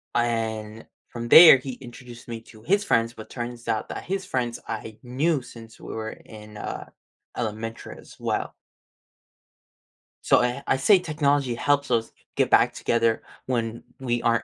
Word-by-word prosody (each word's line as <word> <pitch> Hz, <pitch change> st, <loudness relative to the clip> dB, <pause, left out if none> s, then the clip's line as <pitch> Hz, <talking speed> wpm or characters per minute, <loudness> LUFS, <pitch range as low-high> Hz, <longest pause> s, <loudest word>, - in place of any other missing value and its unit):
and 110 Hz, -2 st, -2 dB, 0.2 s
from 120 Hz, 0 st, -6 dB
there, 160 Hz, -2 st, +11 dB
he 130 Hz, 0 st, -6 dB
introduced 120 Hz, -1 st, -12 dB
me 115 Hz, -1 st, -6 dB
to 110 Hz, -1 st, -17 dB
his 200 Hz, -, +2 dB
friends, 115 Hz, -11 st, +1 dB
but 110 Hz, -2 st, -11 dB
turns 120 Hz, -1 st, -6 dB
out 110 Hz, -, -1 dB
that -, -, -6 dB
his 190 Hz, +1 st, -3 dB
friends 125 Hz, -7 st, -2 dB
I 110 Hz, -1 st, -6 dB
knew 140 Hz, +5 st, 0 dB
since 115 Hz, -2 st, -13 dB
we -, -, -8 dB
were 110 Hz, 0 st, -4 dB
in, 105 Hz, -1 st, -13 dB
uh, -, -, -6 dB, 0.5 s
elementary 115 Hz, 0 st, -5 dB
as -, -, -15 dB
well. -, -, -2 dB, 1.7 s
So, -, -, +5 dB
eh, 125 Hz, +2 st, -1 dB
I 130 Hz, -, +2 dB
say 190 Hz, +9 st, +5 dB
technology 145 Hz, -6 st, 0 dB
helps 140 Hz, +2 st, +1 dB
us 115 Hz, -1 st, +1 dB, 0.2 s
get -, -, +2 dB
back -, -, +4 dB
together 115 Hz, -1 st, +1 dB, 0.2 s
when 115 Hz, -2 st, -2 dB, 0.2 s
we 120 Hz, -2 st, -1 dB
aren't 115 Hz, 0 st, +2 dB
120 Hz, 160 wpm, -25 LUFS, 115-135 Hz, 1.7 s, there